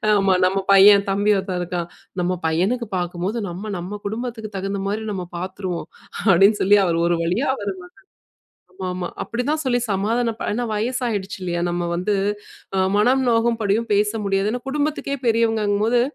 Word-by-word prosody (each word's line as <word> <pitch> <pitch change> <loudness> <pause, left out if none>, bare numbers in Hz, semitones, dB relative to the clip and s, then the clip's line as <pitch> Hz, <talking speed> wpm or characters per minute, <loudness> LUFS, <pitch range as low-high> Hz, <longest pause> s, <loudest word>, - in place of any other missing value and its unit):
ஆமா 195 -2 +3
நம்ம 190 +1 +1
பையன் 200 +1 +7
தம்பி 205 +2 +2
ஒருத்தன் 190 -2 -3
இருக்கான். 175 -1 -3 0.3
நம்ம 180 +1 0
பையனுக்கு 200 +9 0
பார்க்கும்போது 180 +5 -2
நம்ம 200 +5 -6
நம்ம 190 +4 -6
குடும்பத்துக்கு 225 -1 -5
தகுந்த 195 +1 -3
மாரி 215 +2 -2
நம்ம 185 -2 -4
பார்த்துருவோம்." 185 -2 -5 0.4
அப்டின்னு 195 +4 +5
சொல்லி 205 +2 +6
அவர் 165 -1 +1
ஒரு 175 - +2
வழியா 185 +11 0
அவர் 390 - -3
மகன், 360 0 -14 0.8
ஆமாமா, 185 -1 -4 0.2
அப்டி 240 +1 -3
தான் 310 0 0
சொல்லி 245 -1 +2
சமாதானப்ப, 225 +4 0
ஏன்னா 245 +3 -1
வயசாயிடுச்சு 220 -3 -2
இல்லயா? 175 -1 -2
நம்ம 175 0 -2
வந்து 185 +4 0 0.6
அ - - +3 0.2
மனம் 255 +5 +3
நோகும்படியும் 230 -1 +1
பேச 210 +1 +3 0.2
முடியாது, 195 +1 +1
ஏன்னா 245 +1 -3
குடும்பத்துக்கே 290 -1 -1
பெரியவங்கங்கும்போது. 225 0 +2
205 Hz, 150 wpm, -22 LUFS, 185-230 Hz, 0.8 s, பையன்